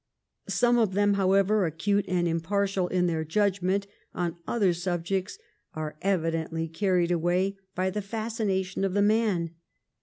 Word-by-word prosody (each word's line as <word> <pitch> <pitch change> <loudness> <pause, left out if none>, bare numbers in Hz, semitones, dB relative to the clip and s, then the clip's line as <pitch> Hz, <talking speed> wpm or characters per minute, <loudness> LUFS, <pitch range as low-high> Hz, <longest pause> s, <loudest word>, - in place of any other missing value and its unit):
Some 240 0 +3
of 215 -5 +2
them, 205 0 +3
however 195 0 +3
acute 200 +6 0
and 175 -1 +1
impartial 190 +3 0
in 180 0 +1
their 165 -2 0
judgment 195 +2 +1 0.3
on 175 -2 -1
other 200 -7 +2
subjects, 180 +2 -2 0.4
are 155 -1 -4
evidently 165 -3 -1
carried 180 +1 +1
away 175 +3 +1 0.2
by 185 +1 0
the 210 +2 -2
fascination 195 -3 -2
of 195 -1 0
the 200 - +4
man. 205 -6 +2
190 Hz, 140 wpm, -27 LUFS, 175-200 Hz, 0.4 s, the